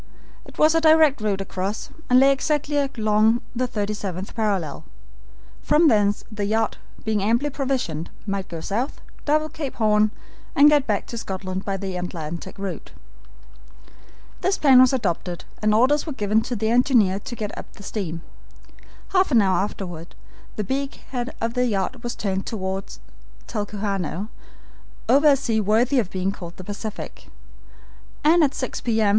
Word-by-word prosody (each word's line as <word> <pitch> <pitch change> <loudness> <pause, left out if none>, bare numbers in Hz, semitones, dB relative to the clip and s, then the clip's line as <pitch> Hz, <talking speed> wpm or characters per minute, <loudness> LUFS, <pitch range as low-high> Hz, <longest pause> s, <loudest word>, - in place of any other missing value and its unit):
It - - -15
was 310 +1 +5
a 325 - +3
direct 315 -5 +5
route 200 -2 0
across, 195 +2 -4 0.2
and 250 0 +6
lay 270 +1 +6
exactly 295 +1 0
along 225 -5 +2 0.2
the 250 +1 0
37th 205 -4 -4
parallel. 200 -10 -1 0.8
From 310 +1 +4
thence 205 -3 +2
the 210 -1 -2
yacht, 220 +2 0 0.3
being 215 -2 +1
amply 235 +8 +1
provisioned, 255 - -2 0.2
might 195 -2 -3
go 165 -1 -6
south, 230 - -2 0.3
double 310 +1 +2
Cape 300 -4 -6
Horn, 215 -1 +3 0.5
and 290 +2 +7
get 290 -3 +3
back 210 -3 0
to 235 - -6
Scotland 190 -2 -4
by 195 -1 -1
the 190 -1 -4
Atlantic 170 0 -5
route. 195 -3 -6 1.5
This 385 +1 +1
plan 265 -4 +7
was 255 - +6
adopted, 180 -8 -2 0.2
and 215 0 +3
orders 260 +9 +3
were 305 - -3
given 215 -2 +1
to 245 - -1
the 220 +1 0
engineer 235 -6 +4
to 240 +4 -7
get 210 -3 -4
up - - -9
the 200 - -13
steam. 175 -6 -4 0.9
Half 375 0 +3
an 245 -6 +5
hour 190 -1 +2
afterward 180 -4 -5 0.4
the 210 - -2
beak 270 +6 -2 0.2
head 245 -1 -3
of 230 +1 -1
the 250 0 +1
yacht 210 +3 -1
was 240 -1 -4
turned 195 -2 -2
toward 190 -2 -3 0.6
Talcahuano, 205 -3 -3 0.8
over 285 +3 +5
a 285 - +7
sea 230 -5 0
worthy 230 +6 +3
of 210 -7 -1
being 190 0 -1
called 175 -3 -9
the 185 - -8
Pacific, 205 +2 -7 1.0
and 325 +2 +5
at 285 -2 +1
six 255 - -4
P. 225 -2 0
M. 215 -2 +4
215 Hz, 160 wpm, -23 LUFS, 195-260 Hz, 1.5 s, and